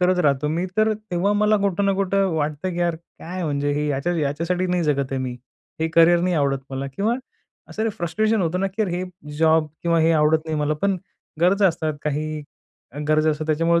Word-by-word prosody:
करत 180 0 +3
राहतो 140 +1 +2
मी 170 +4 -1
तर 215 0 +3 0.2
तेव्हा 180 +3 +1
मला 210 +1 +3
कुठं 200 -1 0
ना 200 - +3
कुठं 195 0 +1
वाटतं, 155 +3 -2
की 175 - -5
यार 175 -1 +1 0.2
काय 180 +2 -5
म्हणजे 145 -1 0
हे 150 +1 -1
याच्या 145 +5 0
याच्यासाठी 165 +6 -1
नाही 180 -1 0
जगत 140 -2 0
आहे 135 - -1
मी. 125 -1 -4 0.4
हे 160 - +1
करियर 170 +1 +6
नाही 180 0 +1
आवडत 140 -2 +1
मला 135 +1 -3
किंवा 215 +4 +1 0.5
असं 220 +1 -2
फ्रस्ट्रेशन 215 +6 +1
होतं 175 +2 -1
ना, 195 - +1
की 195 +3 -2
यार 205 - -1
हे 175 +1 -2 0.4
जॉब 160 -1 +4 0.2
किंवा 170 -1 +2
हे 160 - +4
आवडत 155 0 +4
नाही 160 -1 -2
मला. 150 +1 +1
पण 200 -1 +2 0.4
गरजा 195 +3 +4
असतात 160 -2 -2
काही 150 +1 -2 0.7
गरजा 155 0 +3
असतात 155 0 -3
त्याच्यामुळे 165 +2 +2
165 Hz, 205 wpm, -22 LUFS, 150-185 Hz, 0.7 s, करियर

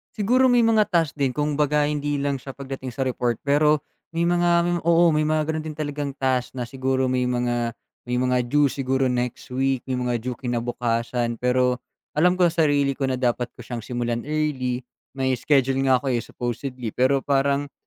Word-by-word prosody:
Siguro, 250 +5 +3
may 245 - +5
mga 225 -2 +3
task 165 -5 +1
din. 135 -3 0
Kumbaga, 150 +1 +1
hindi 145 -1 -1
lang 140 0 0
siya, 135 +1 -7
pagdating 135 -1 -7
sa 130 +2 -2
report, 120 -2 -1
pero 150 +1 +4 0.3
may 165 +1 0
mga, 175 0 +2 0.2
m - - +1
oo, 170 +1 +5
may 155 - +2
mga 155 0 +1
gano'n 160 0 -2
din 155 - -5
talagang 145 -1 -3
task, 130 -2 0
na 125 -2 -5
siguro, 130 +1 0
may 125 0 +1
mga, 120 -1 0 0.3
may 125 0 -1
mga 125 -1 +1
due, 145 +4 +3
siguro 135 0 0
next 125 -1 -2
week, 135 0 0
yung 125 -1 -1
mga 120 -1 0
due, 125 +2 -4
kinabukasan, 120 -1 -2
pero, 125 0 +2 0.3
alam 180 +4 +3
ko 185 - +2
sa 160 -1 +2
sarili 140 -1 +2
ko, 135 0 -2
na 130 - 0
dapat 125 -1 0
ko 125 - -11
siyang 120 +1 -5
simulan 120 +1 -2
early. 135 -5 -1 0.3
May 130 -1 0
schedule 135 -1 +2
nga 130 - +6
ako, 135 - 0
eh, 120 - +1
supposedly, 120 0 -5
pero 130 +3 +2
parang, 140 0 +1
135 Hz, 190 wpm, -23 LUFS, 125-150 Hz, 0.3 s, nga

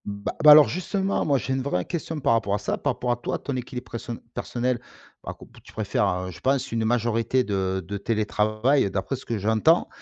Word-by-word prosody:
B 100 0 -6
bah, - - -1 0.2
alors, 150 -2 +10
justement, 190 - -1
moi, 140 -2 +3
j'ai 130 +2 -2
une 130 - -1
vraie 90 -10 -1
question 165 -2 -4
par 120 - +2
rapport 105 -3 +1
à - - 0
ça, 105 - -2
par - - 0
rapport 125 - -2
à 120 - 0
toi, - - -3
ton 140 - -5
équilibre 125 0 -5
preso 115 +1 -6 0.2
personnel, 125 0 -2 0.4
alors - - -7
que - - -13 0.2
tu - - -16
préfères, 90 +1 0
heu, 95 - -6
je 90 - -12
pense 135 +5 0
une 115 -1 -1
majorité 120 +2 +1
de 95 -3 -2
de 100 +1 -4
télétravail 110 +4 +1
d'après 95 +7 -2
ce - - -12
que 115 - -2
j'entends 110 - +3
115 Hz, 220 wpm, -25 LUFS, 105-130 Hz, 0.4 s, alors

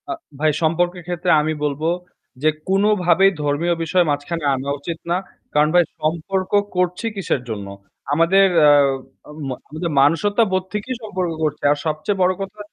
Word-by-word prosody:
আ - - -1 0.3
ভাই 155 0 +3
সম্পর্কের 175 +2 0
ক্ষেত্রে 175 0 -2
আমি 155 +1 -1
বলব 145 0 -2 0.6
যে 155 - +5 0.2
কোনোভাবেই 195 -2 +4
ধর্মীয় 145 +4 +1
বিষয় 175 +2 +2
মাঝখানে 145 +3 -3
আনা 135 +2 -4
উচিত 165 +3 -5
না। 175 - +3 0.4
কারণ 150 +1 +3
ভাই 175 - +7 0.2
সম্পর্ক 170 +4 -2 0.2
করছি 180 +4 0
কিসের 190 -9 -1
জন্য? 105 -3 -5 0.5
আমাদের 170 +6 +4 0.2
আ - - +8 0.8
ম - - -4 0.2
আমাদের 160 +2 -4
মনুষ্যত্ববোধ 185 +6 +2
থেকেই 230 +5 -3
সম্পর্ক 185 -5 -2
করছে। 150 -1 -2
আর 145 - +2
সবচেয়ে 155 +6 -2
বড় 185 0 +4
কথা 195 +2 -7
175 Hz, 150 wpm, -20 LUFS, 155-190 Hz, 0.8 s, আ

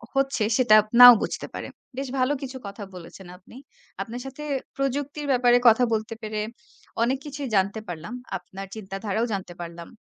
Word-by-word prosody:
হচ্ছে 270 -4 +1
সেটা 240 -4 +5 0.2
নাও 245 0 +13
বুঝতে - - -3
পারে, - - -6 0.3
বেশ 270 0 -3
ভালো 255 +3 +2
কিছু 265 -1 -6
কথা 200 +1 -8
বলেছেন 180 +2 -11
আপনি। 185 - -18 0.5
আপনার 240 +1 -6
সাথে 270 +3 -8 0.3
প্রযুক্তির 285 +2 -2
ব্যাপারে 245 -1 +4
কথা 230 +2 +6
বলতে 215 +1 -2
পেরে 215 -1 -3 0.6
অনেক 260 +3 +1
কিছুই 290 -1 -5
জানতে 200 +3 +1
পারলাম, 170 +4 -7 0.2
আপনার 195 +2 -10
চিন্তাধারাও 205 +2 -3
জানতে 190 -3 -5
পারলাম। 170 0 -8
230 Hz, 155 wpm, -25 LUFS, 195-265 Hz, 0.6 s, নাও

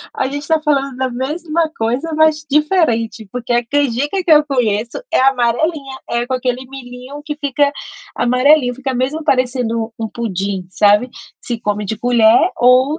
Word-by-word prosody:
A - - -1
gente 285 +2 -4
está 320 +2 +1
falando 275 -3 0
da 260 0 -1
mesma 310 +6 -2
coisa, 250 +9 -2
mas 310 -1 +3
diferente, 270 - +1
porque 245 +1 -4
a 240 0 +2
que 285 +7 0
eu 300 -2 +6
conheço 230 -5 -1
é - - +3
amarelinha, 270 +3 +1
é 235 +1 -1
com 260 - -5
aquele 255 0 -2
milhinho 260 +1 -10
que 295 -1 -5
fica 285 -1 +1 0.5
amarelinho, 250 +1 +3
fica 265 +1 -4
mesmo 265 +6 -1
parecendo 245 -5 0
um 225 - -3
pudim, 195 -4 -3
sabe, 210 +5 +3 0.3
se 235 -2 -5
come 210 -1 -2
de 220 +2 -3
colher 240 +6 +4
ou 255 +5 +4
255 Hz, 155 wpm, -17 LUFS, 235-290 Hz, 0.5 s, eu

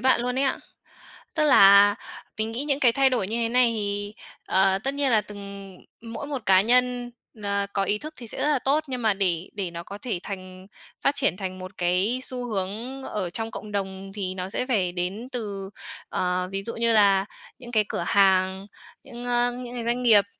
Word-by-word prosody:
bạn 260 0 +3
luôn 250 +1 -1
ấy 275 - +2
ạ. 265 - 0 0.8
Tức 310 -2 +2
là, 200 -6 +7 0.4
mình 220 +1 -1
nghĩ 250 +5 -3
những 280 -1 0
cái 240 -3 +5
thay 270 +1 +4
đổi 235 -7 0
như 225 - -2
thế 230 -1 0
này 245 0 +4
thì, 205 0 -3 0.3
ờ, 190 0 +3
tất 270 +1 0
nhiên 280 -2 +1
là 220 -2 +5
từng 210 0 -11 0.6
ừm, 230 0 -9
mỗi 285 - -5
một 275 -5 -4
cá 190 -1 +6
nhân, 245 +2 +2 0.3
à, 200 0 0
có 195 - +1
ý 205 +2 0
thức 310 +7 -8
thì 235 -3 -10
sẽ - - -8
rất - - +1
là 295 -3 +3
tốt, 285 +5 +1
nhưng 255 -2 -4
mà 220 -2 +3
để 180 -3 0
để 190 -4 -3
nó 170 0 -7
có 200 +3 -9
thể 210 -6 -3
thành 185 -1 -8 0.4
phát 275 - +3
triển 270 -9 +1
thành 185 -1 -5
một 185 +1 -9
cái 185 +8 +1
xu 250 -1 -5
hướng 220 +6 -4
ở 205 -8 -3
trong 225 +5 -4
cộng 210 -1 -8
đồng 195 -1 -4
thì 185 -3 -3
nó 185 0 -4
sẽ 250 - -2
phải 195 -9 +1
đến 185 +7 -4
từ 200 -5 -4 0.4
ờ, 180 0 -1
ví 195 0 -2
dụ 230 - -4
như 230 0 +2
là 200 -3 +5 0.3
những 240 -1 -11
cái 215 -2 +3
cửa - - -2
hàng, 190 -1 +3 0.4
những 240 0 -9
ơ, 245 0 +2
những 245 0 -7
cái 240 -2 -4
doanh 240 +2 0
nghiệp. 215 -5 +6
215 Hz, 220 wpm, -25 LUFS, 195-245 Hz, 0.8 s, là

